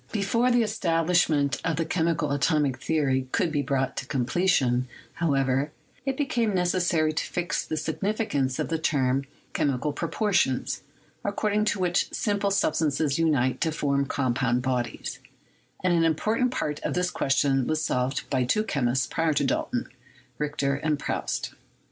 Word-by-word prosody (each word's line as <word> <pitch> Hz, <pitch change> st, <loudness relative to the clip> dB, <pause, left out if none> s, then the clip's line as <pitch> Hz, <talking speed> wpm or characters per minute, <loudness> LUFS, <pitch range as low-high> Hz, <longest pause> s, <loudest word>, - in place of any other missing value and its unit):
Before 230 Hz, +4 st, +1 dB
the 240 Hz, -1 st, +4 dB
establishment 165 Hz, -8 st, +1 dB
of 165 Hz, -, 0 dB
the 165 Hz, +2 st, -1 dB
chemical 160 Hz, -2 st, 0 dB
atomic 145 Hz, -2 st, +1 dB
theory 140 Hz, -4 st, +1 dB
could 165 Hz, -, +1 dB
be 145 Hz, -2 st, +1 dB
brought 135 Hz, -1 st, -1 dB
to -, -, -4 dB
completion, 130 Hz, -2 st, +1 dB, 0.3 s
however, 135 Hz, -3 st, +1 dB, 0.4 s
it 265 Hz, -1 st, 0 dB
became 240 Hz, -7 st, 0 dB
neces 180 Hz, 0 st, +1 dB
sary 155 Hz, -3 st, +2 dB
to 155 Hz, -, -1 dB
fix 175 Hz, -1 st, -2 dB
the 155 Hz, -, -4 dB
signification 160 Hz, -, -1 dB
of -, -, -1 dB
the 165 Hz, -1 st, -1 dB
term 135 Hz, -4 st, +1 dB, 0.3 s
"chemical 145 Hz, -1 st, 0 dB
propor 205 Hz, +7 st, -2 dB
tions/' 130 Hz, -7 st, +1 dB, 0.4 s
according 210 Hz, +1 st, 0 dB
to 205 Hz, -2 st, 0 dB
which 180 Hz, -1 st, +1 dB
simple 205 Hz, -2 st, 0 dB
substances 155 Hz, -5 st, +1 dB
unite 145 Hz, -6 st, +2 dB
to 160 Hz, -, +1 dB
form 140 Hz, -2 st, 0 dB
compound 125 Hz, -2 st, 0 dB
bodies; 125 Hz, -2 st, -2 dB, 0.6 s
and 180 Hz, -1 st, +3 dB
an 165 Hz, -1 st, +3 dB
important 215 Hz, -, +1 dB
part 150 Hz, -, -2 dB
of -, -, -3 dB
this 180 Hz, 0 st, +1 dB
question 135 Hz, -1 st, +1 dB
was 155 Hz, 0 st, 0 dB
solved 125 Hz, +2 st, -1 dB
by 130 Hz, -2 st, +2 dB
two 210 Hz, -, +1 dB
chemists 130 Hz, -, 0 dB
prior 165 Hz, -1 st, 0 dB
to 145 Hz, -, +1 dB
Dalton -, -, -1 dB, 0.3 s
— -, -, -30 dB
Richter 145 Hz, -2 st, 0 dB
and 150 Hz, +1 st, 0 dB
Proust. -, -, -3 dB
155 Hz, 155 wpm, -26 LUFS, 135-180 Hz, 0.6 s, the